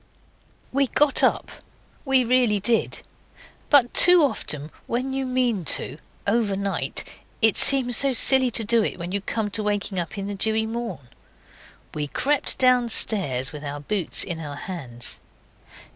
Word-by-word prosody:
We 275 +1 +1
got 295 +2 +3
up. - - 0 0.5
We 265 -2 +3
really 240 -4 +1
did. 230 +3 0 0.7
But 265 -5 +4
too 355 -2 +8
often 150 - -2 0.2
when 255 +3 -3
you 270 -1 -3
mean 250 -6 -1
to, 150 - -8 0.3
overnight, 200 -3 -2 0.2
it 220 -2 +3
seems 250 -4 +5
so 275 -1 +2
silly 260 +1 +3
to 230 -1 +1
do 230 +1 +2
it - - -4
when 175 0 -7
you 200 +1 -2
come 210 0 -4
to 215 - -2
waking 205 -2 -2
in 195 +3 -5
the 205 - -5
dewy 220 +2 0
morn. 225 - -6 0.9
We 150 -1 -4
crept 280 - 0
downstairs 220 - +1
with 150 -1 -10
our 145 0 -6
boots 180 +4 -2
in 170 -2 -5
our 145 -3 -7
hands. 130 -8 -6
220 Hz, 145 wpm, -23 LUFS, 180-255 Hz, 0.9 s, too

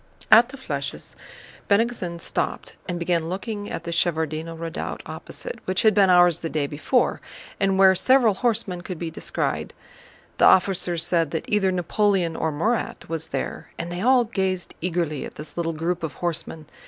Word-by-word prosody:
At 230 +3 +8
the 275 - -9
flèches 265 - -5 0.6
Bennigsen 200 -5 +1
stopped - - -3
and 175 - -2
began 170 -1 0
looking 205 +2 -4
at - - -5
the 170 - -5
Shevárdino 160 -1 -1
Redoubt 165 0 -5
opposite, - - -7
which 185 0 0
had 220 -1 +5
been 195 -1 +4
ours 175 -2 +5
the 165 - -4
day 155 -2 -1
before 150 - 0 0.4
and 195 -1 +2
where 190 0 +7
several 245 +2 +4
horsemen 210 -4 -1
could 180 -1 -6
be 165 0 -4
descried. - - -3 0.6
The - - +6
officers 180 -3 +3
said 165 -3 +1
that 160 - -3
either 200 -3 +2
Napoleon 185 -1 +1
or 160 - -1
Murat 215 +9 -2
was 160 -1 -3
there, - - -5
and 170 +1 -5
they 175 +1 -4
all 250 +2 +5
gazed 190 -5 -2
eagerly 165 -4 -1
at - - -8
this 150 0 -6
little 170 -1 -1
group 170 +2 -2
of 160 -3 -4
horsemen. 165 -2 -2
175 Hz, 170 wpm, -24 LUFS, 165-205 Hz, 0.6 s, At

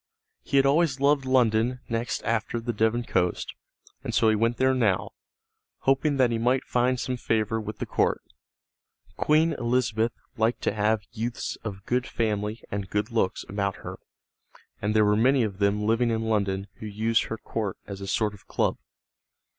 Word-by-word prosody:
He 140 - 0
had 135 - +5
always 140 -1 +3
loved 140 0 +3
London 125 -1 +2
next 115 +1 -2
after 115 +1 -1
the 120 +1 -3
Devon 110 +3 +1
coast, 90 -6 -1 0.5
and - - -3
so 110 - +4
he 110 - +3
went 115 +2 +1
there 130 0 +3
now, 110 -7 +1 0.7
hoping 135 +2 +2
that 125 -3 +4
he 115 - 0
might 125 +3 +2
find 125 +1 +1
some 125 0 -2
favor 110 -1 0
with 110 0 -6
the - - -3
court. - - 0 0.9
Queen 155 +2 +3
Elizabeth 120 -2 0 0.2
liked 115 +2 +1
to - - +1
have 105 0 +1
youths 120 +1 -3
of 100 -3 -6
good 125 +1 0
family 105 -1 -2
and 100 -1 -3
good 105 +2 -1
looks 110 -5 0
about 100 -1 -1
her, - - -6 0.8
and 105 +2 0
there 110 -1 +5
were 105 0 +3
many 125 +4 +4
of 100 -3 -3
them 100 +1 +1
living 115 +2 +2
in 115 -1 0
London 100 -3 0
who 110 - -7
used 110 +2 +1
her 110 - -4
court 110 -3 -4
as 100 -1 -7
a 100 - -5
sort 105 +1 0
of 100 - -16
club. - - 0
115 Hz, 180 wpm, -26 LUFS, 105-125 Hz, 0.9 s, had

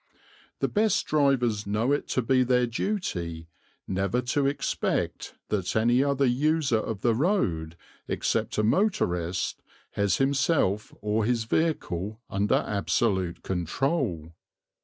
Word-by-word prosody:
The - - +2
best 215 0 +1
drivers 125 -8 +1
know 110 +6 +1
it 145 - 0
to 130 - 0
be 130 +2 +3
their 125 0 +3
duty 90 - -3 0.4
never 100 +5 0
to 140 -1 +2
expect 140 - -2
that 95 -4 -1
any 120 +4 +3
other 140 -1 +1
user 140 -1 +2
of 110 -2 -4
the 120 +1 +3
road 95 - 0 0.3
except - - -1
a 105 - +2
motorist 95 - 0 0.3
has 100 -4 +1
himself 135 - +1
or 105 +1 0
his 120 -1 +1
vehicle 110 - -1
under 100 +2 +1
absolute 100 -3 0
control. 90 - -1
115 Hz, 120 wpm, -27 LUFS, 95-140 Hz, 0.4 s, be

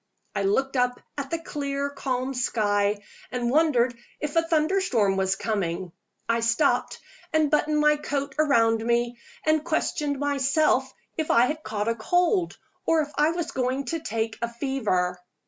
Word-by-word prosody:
I - - 0
looked 265 +8 +1
up 250 0 +1 0.2
at 280 -2 -4
the 330 - -1
clear, 280 -3 -3
calm 260 -1 -2
sky, 205 -4 +1 0.3
and 245 -1 -1
wondered 260 -5 +3 0.2
if 300 +1 -4
a 330 - +5
thunderstorm 315 - +2
was 190 0 +1
coming. 185 -5 -2 0.4
I 230 0 +2
stopped, 230 +5 +1 0.3
and 315 -2 +2
buttoned 300 0 +2
my 300 0 +4
coat 280 -1 -3
round 230 -7 +3
me, 235 +1 0 0.3
and 310 -1 +3
questioned 300 -3 -1
myself 275 -1 +2 0.3
if 315 -1 -2
I 235 +1 +5
had 305 +4 -3
caught 210 -6 -3
a 230 - +2
cold, 355 - +1 0.3
or 325 -1 +3
if 295 -1 -4
I 300 +1 +3
was 335 0 -3
going 260 +2 -1
to 330 - -1
have 225 -5 -2
a 235 - 0
fever. 215 -9 -1
270 Hz, 160 wpm, -26 LUFS, 230-300 Hz, 0.4 s, a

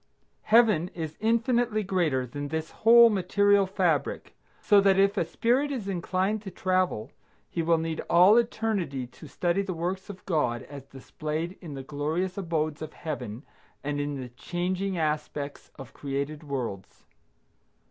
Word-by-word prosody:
Heaven 215 -7 +4
is 160 -2 -5
infinitely 230 0 +1
greater 170 -9 0
than 145 +4 -5
this 160 +2 -4
whole 235 +1 +7
material 200 +1 +3
fabric, 175 -7 -1 0.3
so 205 -2 +5
that 195 -1 +4
if 195 +1 +4
a 195 - +2
spirit 245 - +1
is 240 -8 -4
inclined 190 +3 -1
to 205 - -7
travel, 185 - -1 0.4
he 170 - -1
will 165 0 +3
need 160 0 -3
all 180 +5 +7
eternity 215 - -1
to 125 +5 -14
study 175 +7 0
the 190 -3 -4
works 185 +4 -3
of 190 -2 -10
God 145 -9 0
as 140 -2 -11
displayed 155 +6 -5
in 160 -6 -8
the 135 - -6
glorious 155 +7 -2
abodes 160 -5 -2
of 155 -1 -6
Heaven 125 -7 -6 0.4
and 145 0 -2
in 145 -1 -3
the 125 -1 -6
changing 180 +8 -3
aspects 150 -2 -3
of 135 -4 -10
created 140 +2 -4
worlds. 125 -9 -5
170 Hz, 150 wpm, -27 LUFS, 145-195 Hz, 0.4 s, whole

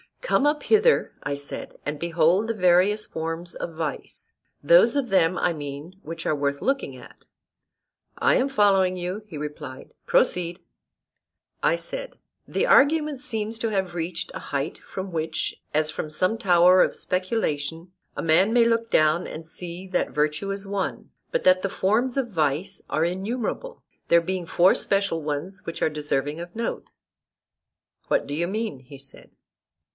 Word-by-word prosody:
Come 290 - +2
up 295 0 0
hither, 445 +2 +3
I 145 - -2
said, 140 0 -6
and 145 0 -3
behold 170 +5 +2
the 230 - 0
various 190 +2 +3
forms 165 +2 -4
of 170 - -6
vice, 160 -1 -5 0.3
those - - +6
of 275 -4 0
them, 185 -2 +3
I 175 - +2
mean, 150 +4 -7
which 165 +1 -7
are - - +2
worth 140 -1 -1
looking 270 +1 -1
at. - - -15 0.9
I - - +3
am 260 - +2
following 195 -7 +3
you, 180 +4 -4
he 165 -7 -8
replied: 145 -2 -7
proceed. 180 - +1 1.0
I - - +3
said, - - -7 0.3
The - - 0
argument 295 -1 +4
seems 225 -5 -3
to 225 - -1
have 190 -4 -1
reached 170 0 -4
a - - -5
height 140 +2 -3
from 190 0 -7
which, 160 -1 -3
as 155 +1 +1
from 155 - -4
some 185 +8 +1
tower 180 -3 +5
of - - +2
speculation, 175 -4 -2 0.2
a - - -3
man 175 +7 +4
may 240 -1 +5
look 230 0 +1
down 155 0 +3
and 160 +1 -8
see 175 +2 -7
that 180 - 0
virtue 150 +6 0
is 195 0 -3
one, 195 -1 -3 0.2
but - - 0
that 185 0 +5
the 195 - -1
forms 225 +8 +1
of 260 -4 -1
vice 160 +3 -1
are 155 - +1
innumerable; 230 - -3 0.2
there 170 0 +5
being 180 0 -3
four 180 +3 +5
special 195 -4 0
ones 150 +6 -3
which 165 - -6
are - - +3
deserving 145 0 -2
of 175 +2 -8
note. 230 +1 -3 1.2
What - - +1
do 145 - -6
you 170 +3 0
mean? 215 - -3
he 135 +2 -13
said. 135 0 -12
180 Hz, 165 wpm, -25 LUFS, 160-220 Hz, 1.2 s, those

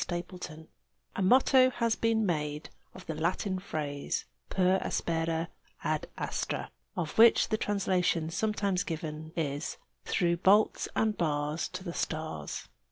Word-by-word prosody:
PER 175 - -2
ASPERA 175 -3 -8 0.5
A - - -2
motto 255 +5 +6
has 230 -3 0
been 225 -1 +2
made 150 -4 -2 0.2
of 185 - -11
the 160 - -3
Latin 185 +4 -1
phrase 145 -6 -3 0.2
"per 185 0 +3
aspera 165 0 -1 0.3
ad - - -1
astra," - - -3 0.3
of 170 +2 -2
which 230 0 +7
the 215 - +1
translation 180 -6 +1
sometimes 200 -1 0
given 155 -1 -5
is 145 -2 -2 0.3
"through 170 -1 +1
bolts 200 +5 +4
and 220 -1 +1
bars 150 -1 0
to 185 0 -7
the 170 -3 -5
stars." 155 - -4
175 Hz, 135 wpm, -30 LUFS, 155-200 Hz, 0.5 s, which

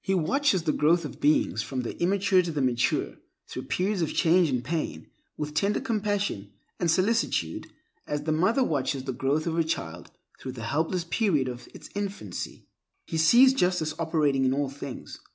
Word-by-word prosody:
He 195 - +1
watches 190 - +2
the 160 - +1
growth 160 +3 +2
of 145 - -8
beings, 145 - +2
from 130 +3 -3
the 120 - -5
immature 190 +1 +3
to 175 -2 -3
the 150 - -3
mature, 125 -3 0 0.3
through - - -7
periods 190 +1 -1
of 160 - 0
change 175 -1 +4
and 125 -2 -1
pain, 125 - -3 0.3
with 150 0 -4
tender 200 +5 +1
compassion 205 - -2 0.3
and 175 - +1
solicitude, 185 - +1 0.4
as 145 0 -2
the 155 - -1
mother 190 - +2
watches 140 - -1
the 130 -1 -3
growth 135 +5 0
of 165 - -1
her 165 - +3
child 85 - -4 0.3
through 130 - -6
the 115 -3 -8
helpless 160 +8 -1
period 165 - +1
of 125 -1 -7
its - - -12
infancy. 200 -1 -5 0.4
He 165 - -4
sees 240 +12 +7
justice 180 -9 +1
operating 150 -5 +1
in 130 0 +2
all 140 -1 -1
things. 140 -1 -8
160 Hz, 180 wpm, -27 LUFS, 135-185 Hz, 0.4 s, sees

